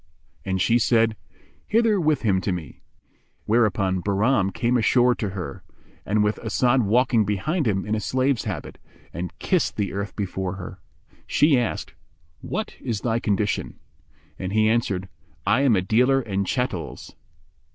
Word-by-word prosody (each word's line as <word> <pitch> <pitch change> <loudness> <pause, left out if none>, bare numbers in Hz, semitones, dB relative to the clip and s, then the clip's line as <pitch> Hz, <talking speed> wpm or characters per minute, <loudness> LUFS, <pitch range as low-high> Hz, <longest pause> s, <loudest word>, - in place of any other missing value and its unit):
And 95 -1 -1
she 115 +7 +3
said, 115 -1 +3 0.5
"Hither 220 -3 +3
with 155 -4 +1
him 95 -4 +2
to 95 - -1
me"; 85 -3 -6 0.6
whereupon 100 -5 +2
Bahram 100 +2 +2
came 120 +4 0
ashore 125 +1 +4
to 105 -4 -3
her, 90 -8 -6 0.5
with 105 +1 +1
As'ad 120 +3 +2
walking 115 +1 +3
behind 125 - -1
him 95 -3 0
in 105 - -2
a 110 - +1
slave's 130 +5 0
habit, 95 -8 -5 0.3
and 90 +1 -5
kissed 185 -3 0
the 100 -3 -2
earth 100 +1 -4
before 95 -2 -3
her. 95 0 -8 0.5
She 150 -1 +4
asked, 120 -3 -2 0.5
"What - - -4
is 110 -4 -3
thy 115 -1 0
condition?"; 105 -2 -1 0.6
and 95 +1 -4
he 110 0 +3
answered, 105 -5 0 0.4
"I 130 - +3
am 135 -6 +4
a 95 - +1
dealer 125 +7 +3
in 100 -6 -2
chattels." 110 -7 -3
110 Hz, 150 wpm, -24 LUFS, 95-125 Hz, 0.6 s, ashore